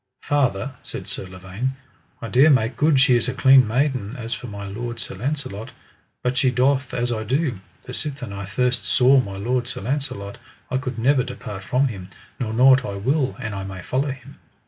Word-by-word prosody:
Father, 130 -3 0
said - - -7
Sir 95 - -4
Lavaine, 95 +8 -4 0.5
I - - -3
dare 130 +8 +6
make 130 -3 +3
good 150 -2 +3
she 130 -1 +5
is 120 - +2
a 130 - -3
clean 130 -2 +6
maiden 125 -2 0
as 115 -1 -4
for 125 - -6
my 100 -2 -7
lord 120 +4 -5
Sir - - -5
Launcelot; 125 -1 -4 0.5
but 125 +1 0
she 130 0 +3
doth 130 +2 +2
as 120 0 -1
I 110 -2 -1
do, 130 - 0 0.3
for 125 - -7
sithen 135 -7 -4
I 100 0 -5
first 125 +3 0
saw 130 +3 +5
my 100 -5 -3
lord 120 +4 -1
Sir 125 - -5
Launcelot, 115 -5 -3 0.3
I 130 - +2
could 130 -2 -5
never 130 +3 +3
depart 125 -6 -6
from 130 +8 +1
him, 95 -5 -8 0.3
nor 115 -4 -2
nought 130 +3 +6
I 100 -6 -4
will 130 +7 0
an 110 -5 -5
I 95 -1 -4
may 95 -2 -7
follow 135 +7 0
him. 130 -1 -9
125 Hz, 200 wpm, -23 LUFS, 105-135 Hz, 0.5 s, dare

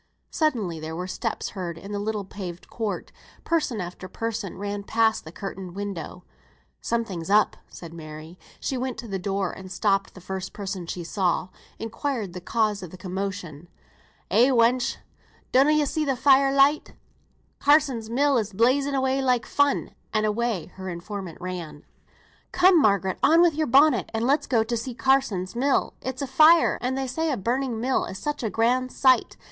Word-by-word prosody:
Suddenly 225 - 0
there 160 +1 -6
were 180 +2 -4
steps 220 +4 -3
heard 175 -4 -5
in 195 +4 -9
the 205 - -2
little 210 -1 -2
paved 180 -3 -8
court; 220 -3 -4 0.3
person 300 -9 0
after 180 +1 -6
person 225 -2 -4
ran 205 +1 -4
past 220 0 +1
the 160 - -9
curtained 190 -1 -7
window. 195 -3 -6 0.6
"Something's 200 -8 -2
up," 210 +1 +4
said 170 -2 -11
Mary. 155 +1 -10 0.2
She 265 - -2
went 255 -1 -3
to 240 - -7
the 195 -2 -3
door 195 0 -1
and 190 -1 -10
stopping 195 0 +1
the - - -10
first 190 +1 -6
person 190 -4 -5
she 175 0 -4
saw, 180 +1 0 0.3
inquired 225 -3 -3
the 180 - -7
cause 215 +1 0
of 180 - -7
the 185 - -11
commotion. 185 -4 -5 0.6
"Eh, 230 +6 +5
wench! 245 0 +2 0.5
donna 270 +3 +5
ye 305 -1 +3
see 310 +2 -1
the 275 -3 0
fire 270 +1 +5
light? 275 +2 +3 0.7
Carsons' 275 -7 +3
mill 275 +2 +3
is 215 -2 -4
blazing 270 +7 +2
away 265 0 +1
like 250 -3 +1
fun;" 285 0 +1 0.2
and 215 -1 +1
away 215 -4 -1
her 190 0 -5
informant 180 0 -6
ran. 175 -5 -6 0.7
"Come, 365 -2 +5
Margaret, 200 -5 +2
on 330 +3 +6
wi' 350 - +6
your 310 0 -1
bonnet, 280 +5 +4
and 225 +1 0
let's 285 +3 +2
go 230 -4 +3
to 235 +2 -2
see 235 +1 -4
Carsons' 255 -8 +1
mill; 270 +3 +1
it's 260 +1 -4
afire, 310 +5 +5
and 255 +2 -1
they 270 - -1
say 320 +6 -1
a 275 - 0
burning 240 +3 -1
mill 255 +3 +1
is 190 - -7
such 295 +7 -3
a 225 - -1
grand 250 +4 +1
sight. 260 -2 +3
220 Hz, 175 wpm, -25 LUFS, 190-265 Hz, 0.7 s, on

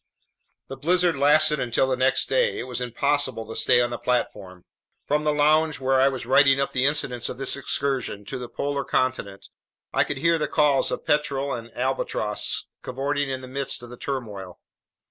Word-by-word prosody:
The 135 - -8
blizzard 175 +4 +2
lasted 150 +1 +4
until 125 +2 +1
the 130 - 0
next 130 +1 +1
day. - - +1
It - - -3
was 125 -1 -5
impossible 130 -1 -1
to 110 - -7
stay 125 - +3
on 120 0 0
the 120 - -4
platform. 100 -7 -3 0.4
From 150 +1 0
the 150 - +3
lounge, 150 -1 +2
where 130 0 +2
I 135 - +5
was 130 -2 -3
writing 135 -1 +5
up 140 - 0
the 130 0 +1
incidents 125 -5 -1
of - - -6
this 135 0 +1
excursion 135 -6 -2
to 115 - -5
the 125 -1 -7
polar 140 +2 -2
continent, 130 -8 -2 0.4
I - - +3
could 145 - -4
hear 165 +3 +2
the 150 - -1
calls 145 -2 +2
of - - -4
petrel 140 -2 0
and 115 -1 -7
albatross 125 -4 -1 0.2
cavorting 140 +2 -2
in 130 -1 -3
the 130 - -9
midst 135 -1 -3
of 120 - -10
the - - -8
turmoil. 105 -11 -6
135 Hz, 190 wpm, -24 LUFS, 125-145 Hz, 0.4 s, I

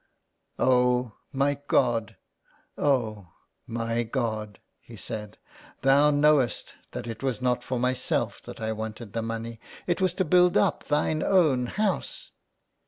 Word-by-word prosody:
"Oh! 125 -1 +3 0.2
my 140 +1 +1
God, 115 -5 +1 0.6
oh! 110 - 0 0.3
my 115 0 -1
God,'' 110 -4 -3 0.2
he - - -13
said, 105 -1 -7 0.2
" - - -23
Thou 140 +2 +5
knowest 145 -3 +2 0.2
that - - -5
it 115 -2 -6
was 130 -3 -1
not 125 -1 +1
for 130 - -2
myself 125 +1 -1
that - - -9
I 110 -1 -2
wanted 110 0 -6
the 115 - -1
money, 115 0 -5 0.3
it 175 +1 0
was 185 -2 +1
to 190 - +1
build 180 +2 +5
up - - +1
Thine 150 +1 +1
Own 150 -10 +3
House." 215 - -2
125 Hz, 140 wpm, -27 LUFS, 115-145 Hz, 0.6 s, Thou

